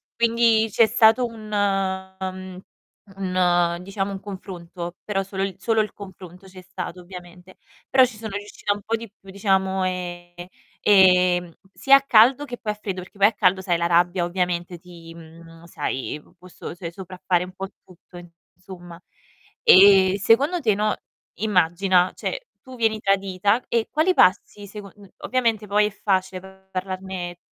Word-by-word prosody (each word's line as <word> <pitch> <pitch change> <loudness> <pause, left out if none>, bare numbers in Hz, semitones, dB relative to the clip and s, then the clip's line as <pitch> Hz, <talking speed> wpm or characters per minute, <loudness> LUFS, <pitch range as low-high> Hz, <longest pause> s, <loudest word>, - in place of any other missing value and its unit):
quindi 230 -1 +3
c'è 230 +1 +4
stato 225 +2 +4
un 215 -2 -11
ehm, 190 -2 -3 0.6
un 175 -2 +1
diciamo 195 +1 -4
un 195 - -6
confronto, 180 -3 -8
però 195 -2 -2
solo 195 0 -4
il 195 -2 -3
solo 220 +3 +1
il 210 - -4
confronto 190 -2 -12
c'è 185 0 -13
stato 180 -1 -8
ovviamente. 180 0 -13 0.3
Però 260 0 +6
ci 240 -4 -2
sono 215 -2 -7
riuscita 205 0 -3
un 205 - -10
po' 230 +3 -2
di 225 -2 -9
più, 195 -2 -19
diciamo, 190 -1 0
ehm, 175 -1 -6 0.3
ehm, 180 -3 +4 0.2
sia 275 +5 +5
a - - -3
caldo 260 +2 +4
che 245 -3 -7
poi 210 - -3
a - - -6
freddo, 195 -3 -5
perché 195 - -18
poi 200 - +7
a 220 - -1
caldo 190 0 +2
sai 175 -2 0
la 170 - -1
rabbia 175 +1 +2
ovviamente 175 -1 -3
ti 170 -2 -13
mhmm, 165 0 -15
sai, 150 -3 -4
p - - -25
può 180 +1 -16
so 170 - -9
se 170 -1 -8
sopraffare 180 -1 -2
un 180 - -9
po' 195 +1 -6 0.2
tutto, 180 0 -17 0.4
insomma. 175 -2 -12 0.6
Ehm, 195 - +7
secondo 275 - +2
te, 215 -5 +2
no, 210 +1 0 0.4
immagina, 185 -2 +2
cioè, - - -5
tu 260 -1 -12
vieni 220 -2 0
tradita 195 +3 0
e 230 -1 0
quali 320 +5 +2
passi 200 +2 +2
secon 200 -1 -11 0.2
ovviamente 230 -4 -1
poi 210 +1 +2
è - - -4
facile 190 -2 -2 0.3
parlarne 185 -1 -5
190 Hz, 160 wpm, -22 LUFS, 180-210 Hz, 0.6 s, poi